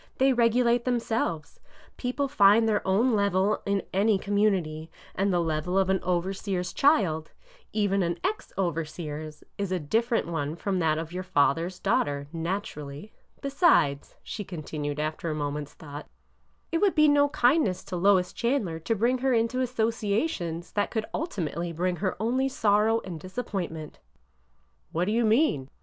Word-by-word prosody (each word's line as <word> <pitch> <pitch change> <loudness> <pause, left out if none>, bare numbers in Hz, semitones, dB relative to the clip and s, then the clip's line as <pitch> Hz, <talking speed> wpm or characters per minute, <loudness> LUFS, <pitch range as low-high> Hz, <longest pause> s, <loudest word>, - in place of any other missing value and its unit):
They 265 0 +4
regu 240 0 +3
late 235 0 +3
themselves. 225 -10 -2 0.4
People 265 +3 -2
find 225 -4 +5
their 210 -2 +2
own 225 +7 +3
level 200 0 +2
in 200 -1 +1
any 200 +2 +3
com 200 +2 -3
munity, 170 -7 +1 0.2
and 195 +1 0
the 175 - +2
level 165 +2 -1
of 190 -1 +3
an 190 - +2
overseer's 180 +1 -2
child 185 - +2 0.2
— - - -27
even 200 -2 +1
an 170 -1 -1
ex 405 +4 -2
overseer's 155 -3 -4
— - - -44
is 200 -2 -2
a 185 - 0
different 225 - 0
one 155 -2 -3
from 190 +1 -2
that 155 -2 +2
of 165 +1 -5
your 180 - -3
father's 175 0 +1
daughter, 140 0 0
naturally. 165 -1 -5 0.3
Besides," 275 - +2
she 210 - -5
continued 150 -4 -5
after 155 +3 -2
a 155 - -2
moment's 145 0 -4
thought, 145 -1 -9 0.6
it 330 - +1
would 400 -1 +2
be 305 -1 +6
no 290 0 +4
kindness 245 - +2
to 185 - -6
Lois 185 0 +3
Chandler 235 -10 -1
to 225 +8 -1
bring 240 +5 +1
her 265 0 +1
into 230 +3 +1
associations 220 - -1
that 205 -1 0
could 220 -2 -2
ulti 220 - -2
mately 170 +1 -4
bring 180 +2 0
her 185 +1 -2
only 255 +5 +1
sorrow 220 -1 +2
and 175 -4 -7
disappointment." 185 -5 -5 0.5
" 60 +2 -42
What 170 +2 +1
do 205 - -1
you 230 +1 +2
mean 215 - +2
190 Hz, 165 wpm, -27 LUFS, 160-230 Hz, 0.6 s, be